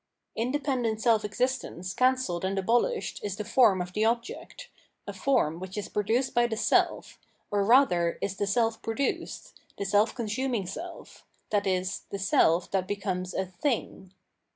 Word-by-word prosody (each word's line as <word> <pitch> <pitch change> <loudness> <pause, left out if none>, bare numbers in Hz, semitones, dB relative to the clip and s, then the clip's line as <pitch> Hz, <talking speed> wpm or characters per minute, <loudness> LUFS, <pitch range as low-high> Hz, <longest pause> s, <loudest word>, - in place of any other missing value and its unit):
Independent 250 -2 -1
self 220 -2 +3
existence 210 -5 -2
can 255 +1 +3
celled 180 -9 -3
and 190 +1 -1
abolished 240 - 0
is 200 -2 -3
the 210 - -4
form 205 -8 +4
of 180 0 -11
the 210 - +1
object, 235 - -2 0.4
a - - -6
form 175 - +1
which 185 +2 -7
is 210 - -4
produced 225 +6 0
by 240 0 +3
the 220 -2 -3
self, - - +1 0.3
or 205 -1 +2
rather 195 -8 +4
is 195 -1 -3
the 205 - -1
self 225 +2 +1
produced, 225 +5 -3 0.2
the 200 - -3
seH 205 +4 +2
consuming 235 -2 -2
self, 335 - -8 0.3
i.e. 190 -3 +1 0.2
the 200 - -4
self 180 -2 +2
that 190 -1 0
becomes 185 -2 -3
a 190 - 0
" - - -34
thing." 225 -8 -2
210 Hz, 160 wpm, -28 LUFS, 190-245 Hz, 0.4 s, form